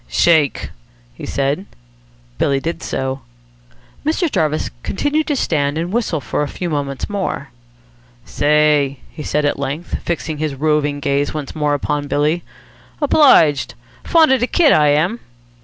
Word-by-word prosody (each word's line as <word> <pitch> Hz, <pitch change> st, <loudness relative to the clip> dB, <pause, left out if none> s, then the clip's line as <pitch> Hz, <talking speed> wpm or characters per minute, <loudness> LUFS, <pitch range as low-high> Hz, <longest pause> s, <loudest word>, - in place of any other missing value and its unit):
"Shake!" 145 Hz, -, +2 dB, 0.4 s
he -, -, -9 dB
said. 140 Hz, +7 st, -1 dB, 0.7 s
Billy 140 Hz, -1 st, +2 dB
did 165 Hz, +5 st, -4 dB
so. 130 Hz, 0 st, -3 dB, 0.8 s
Mr. 320 Hz, +2 st, 0 dB
Jarvis 155 Hz, -1 st, 0 dB
continued 295 Hz, -, -1 dB
to 295 Hz, -, 0 dB
stand 145 Hz, -, 0 dB
and 170 Hz, +4 st, -3 dB
whistle 220 Hz, -9 st, 0 dB
for 130 Hz, +2 st, -3 dB
a 150 Hz, -, 0 dB
few 175 Hz, +3 st, -5 dB
moments 140 Hz, -2 st, -3 dB
more. 190 Hz, -8 st, -3 dB, 0.8 s
"Say!" 150 Hz, -2 st, +2 dB
he -, -, -9 dB
said 150 Hz, 0 st, -1 dB
at 145 Hz, -, 0 dB
length, 140 Hz, +5 st, -4 dB
fixing 160 Hz, -3 st, -3 dB
his 155 Hz, -3 st, -2 dB
roving 145 Hz, 0 st, 0 dB
gaze 140 Hz, +1 st, 0 dB
once 150 Hz, -3 st, -5 dB
more 150 Hz, -1 st, +1 dB
upon 145 Hz, 0 st, -2 dB
Billy. 150 Hz, +4 st, +1 dB, 0.6 s
"Obliged. 260 Hz, -, +4 dB, 0.3 s
Fond 325 Hz, -4 st, +4 dB
of 265 Hz, -, +4 dB
de 245 Hz, -, 0 dB
kit, 315 Hz, -2 st, +4 dB
I 150 Hz, -1 st, +4 dB
am." 155 Hz, +11 st, +2 dB
150 Hz, 145 wpm, -18 LUFS, 145-175 Hz, 0.8 s, Obliged